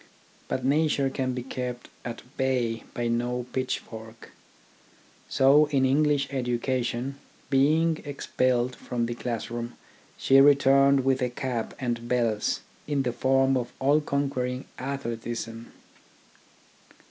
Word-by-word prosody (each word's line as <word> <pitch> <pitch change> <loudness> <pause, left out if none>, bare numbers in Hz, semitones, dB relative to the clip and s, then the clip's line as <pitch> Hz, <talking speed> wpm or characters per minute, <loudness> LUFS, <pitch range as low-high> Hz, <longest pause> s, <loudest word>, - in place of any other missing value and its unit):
But 130 - -2
nature 140 -1 +2
can 130 -1 -1
be 125 - -4
kept 125 -1 -5 0.2
at 120 -1 -6
bay 125 -4 0
by 120 0 -1
no 120 +1 -1
pitchfork; 115 -3 -5 1.0
so 140 +3 +5
in 140 -3 +2
English 145 +1 +2
education, 125 +1 -1 0.3
being 155 +4 +3
expelled 130 -3 0
from 120 -1 -3
the 120 - -3
classroom, 120 0 -4 0.4
she 135 0 +5
returned 140 -1 +5
with 135 0 +2
a 125 - +1
cap 120 -2 -3
and 120 -2 -2
bells 115 -4 +1 0.3
in 145 -2 0
the 125 -2 -1
form 135 +1 +2
of 125 -1 -2
all 145 +3 +3
conquering 135 -3 -2
athleticism. 115 -3 -4
130 Hz, 115 wpm, -27 LUFS, 120-135 Hz, 1.0 s, so